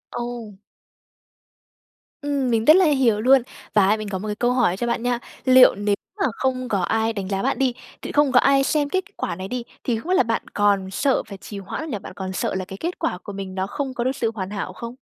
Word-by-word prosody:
Ồ! 240 -4 -5 1.6
Ừm, 285 -3 -1
mình 225 -1 +1
rất 310 - +9
là 375 - +5
hiểu 260 -8 +3
luôn. 260 +3 +6 0.3
Và 195 -2 +5
á 215 - +3
mình 215 -1 -5
có 190 - -2
một 215 - -5
cái 210 - -2
câu 245 +3 +1
hỏi 235 -8 +2
cho 240 - -2
bạn 235 0 -1
nha, 245 -1 0 0.3
liệu 255 -1 +7
nếu 205 0 0 0.3
mà - - +4
không 255 -1 -1
có 200 -4 +1
ai 225 +5 0
đánh 200 -3 -4
giá 195 -1 -1
bạn 270 - 0
đi, 260 -2 +2 0.3
tự - - -5
không 290 -2 +3
có 250 - +6
ai 275 +1 +4
xem 290 +1 +1
kết 375 +4 0
quả - - -2
này 185 +2 -6
đi, 245 +3 -4 0.2
thì 235 -3 0
không 320 - -9
biết 370 - +3
là - - +5
bạn 230 -1 -1
còn 200 -2 +2
sợ 270 +7 +1
phải 200 -3 -10
trì 200 +1 -8
hoãn 195 +10 -6
hay 315 - -6
là 210 - -3
bạn - - -10
còn 190 0 -5
sợ 185 - -2
là 190 -1 -2
cái 190 +1 -9
kết 345 - -4
quả - - -1
của 205 - -7
mình 195 -1 -6
nó 190 0 -1
không 265 +4 -4
có 240 - -2
được 260 +2 0
sự 230 -4 -1
hoàn 190 -3 -4
hảo 195 -2 -4
không? 235 +5 -8
230 Hz, 265 wpm, -22 LUFS, 200-260 Hz, 1.6 s, rất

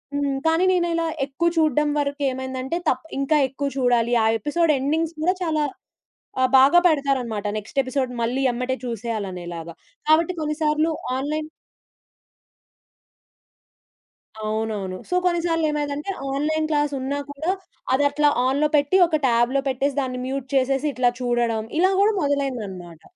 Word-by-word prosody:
హ్మ్. 285 -1 0
కానీ, 325 +3 +3
నేనిలా 340 -2 +1 0.2
ఎక్కువ 290 +5 0
చూడడం 300 -2 +3
వరకేమైందంటే 265 0 -2
తప్ 255 +4 -1
ఇంకా 275 +3 +2
ఎక్కువ 280 +2 -3
చూడాలి. 240 -2 +2
ఆ - - +4
ఎపిసోడ్ 310 +5 +2
ఎండింగ్స్ 320 +4 -1
గూడా 365 +4 +2
చాలా 310 -3 0 0.8
ఆహ్, 255 -1 +3
బాగా 275 +6 +6
పెడతారన్నమాట. 265 -9 0
నెక్స్ట్ 215 +7 -7
ఎపిసోడ్ 260 0 -2
మళ్ళీ 250 +4 0
ఎమ్మటే 250 +2 -2
చూసేయాలి 225 -3 -3
అనేలాగా. 170 -2 -7 0.3
కాబట్టి 325 +3 +4
కొన్నిసార్లు 305 +1 0 0.3
ఆన్‌లైన్ 305 +3 -3 2.9
అవునవును. 215 -3 -3
సో 360 - 0
కొన్నిసార్లు 340 -2 +1
ఏమైందంటే, 295 +3 -3 0.2
ఆన్‌లైన్‌ 310 +3 0
క్లాస్ 295 -1 +1
ఉన్నా 270 +2 -2
కూడా 310 +5 -2 0.4
అది 270 +2 +3
అట్లా 295 +1 +2 0.2
ఆన్‌లో 280 +4 +2
పెట్టి 290 +4 +2
ఒక 315 -2 0
ట్యాబ్‌లో 240 +3 +2
పెట్టేసి 270 +1 0
దాన్ని 255 -1 -3
మ్యూట్ 265 0 -4
చేసేసి 270 +2 +1
ఇట్లా 250 -1 +2
చూడడం, 240 -2 0 0.2
ఇలా 375 +2 +4
గూడా 415 +2 +4
మొదలైందన్నమాట. 220 - -3
275 Hz, 130 wpm, -23 LUFS, 245-310 Hz, 2.9 s, బాగా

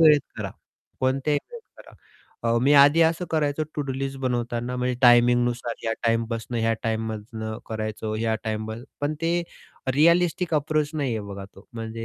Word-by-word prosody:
वेळेत 150 -3 +7 0.2
करा, - - -4 0.5
कोणत्याही 135 +3 +1
वेळेत 475 -2 -9 0.2
करा. - - -14 0.5
अ, 115 0 +2
मी 140 +2 +4
आधी 145 +3 +7
असं 165 +2 +2
करायचो 155 -1 +1
टु-डू 140 -3 -2
लिस्ट 135 0 -4
बनवताना, 120 -1 -2
म्हणजे 125 0 0
टायमिंगनुसार 120 -1 +4
या 115 - +1
टाईम 115 0 +2
बसनं, 115 +1 -3
ह्या 115 0 +2
टाईममधनं 110 0 -3
करायचो, 110 0 -4
ह्या 110 0 0
टाईम 110 0 -2 0.3
पण 145 +1 0
ते 170 +1 +1 0.5
रिअलिस्टिक 170 +2 +3
अप्रोच 150 0 +1
नाहीये 130 -7 -1
बघा 100 -1 -7
तो. 100 +1 -17
म्हणजे 115 0 -5
125 Hz, 155 wpm, -25 LUFS, 115-145 Hz, 0.5 s, वेळेत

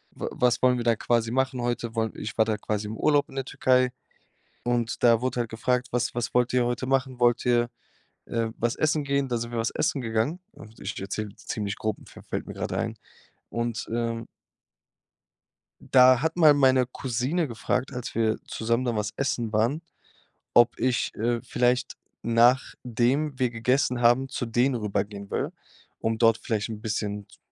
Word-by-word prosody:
wa - - -4
was 125 -1 +1
wollen 125 -1 +4
wir 120 - -2
dann 115 -2 +3
quasi 115 -1 +1
machen 130 0 0
heute.“ 120 -1 -2
Woll 110 -1 0
ich 110 +2 -6
war 110 - +5
da 110 -1 -1
quasi 105 0 -3
im 110 - -5
Urlaub 145 -2 +2
in - - -13
der 135 -1 -2
Türkei 125 -1 +2 0.7
und 120 -1 -1
da 115 -2 +5
wurde 130 -1 -1
halt 115 - -2
gefragt: 125 +2 0
„Was 120 -1 0
was 120 -1 -2
wollt 125 0 +2
ihr 125 -1 +3
heute 120 +2 -2
machen? 130 -1 0
Wollt 120 -1 +3
ihr, 120 -1 +3 0.6
äh, 115 -1 -1
was 120 +1 0
essen 155 -1 +1
gehen?“ 140 -1 0
Dann 120 -2 0
sind 120 +1 -5
wir 120 - -3
was 115 - 0
essen 140 - 0
gegangen. 115 +9 -1
Und 110 +1 -14
ich - - -5
erzähle 100 +1 -4
ziemlich 100 -2 -4
grob, 110 -1 -2
fä - - -13
fällt - - -3
mir - - -6
grade - - -3
ein. - - -2 0.5
Und, 115 0 -2
ähm 115 -1 -2 1.7
da 130 -1 +7
hat 160 +2 0
mal 155 -4 +7
meine 130 -3 +4
Cousine 130 +7 -1
gefragt, 125 +3 -2
als 125 -1 -5
wir 110 -1 +1
zusammen 115 +3 -1
dann 115 -2 0
was 105 -1 -2
essen 120 -5 -1
waren, 120 +9 +1 0.7
ob 120 0 +5
ich, 125 -1 0
äh, 115 +2 0
vielleicht, 125 0 0 0.3
nachdem 125 +3 +2
wir 125 - +2
gegessen 125 +2 +1
haben, 120 +3 +4
zu 125 - -3
denen 120 +3 +2
rübergehen 100 -2 -3
will, - - -1 0.5
um 110 0 -1
dort 115 -1 +4
vielleicht 110 -1 -2
'n 105 -1 -6
bisschen 105 -2 -3
z - - -20
120 Hz, 185 wpm, -26 LUFS, 115-130 Hz, 1.7 s, da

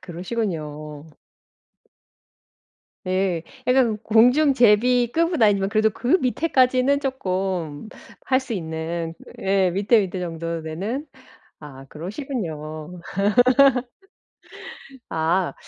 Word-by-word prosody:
그러시군요. 165 -6 -5 2.0
예. 185 -3 0 0.2
약간 250 -4 +3
공중제비 245 0 +4
급은 335 -3 +1
아니지만 200 -2 +3
그래도 220 0 +3
그 255 - +1
밑에까지는 260 0 +2
쪼끔 190 - -3 0.4
할 260 0 +2
수 260 -2 -7
있는 165 -2 -4 0.3
예 190 -1 +2
밑에, 205 +5 +3
밑에 190 -2 -4
정도 165 -1 -4
되는. 205 - -4 0.5
아 135 -3 -11
그러시군요. 170 - -6 2.1
아. 165 +3 0
195 Hz, 190 characters per minute, -22 LUFS, 165-245 Hz, 2.1 s, 공중제비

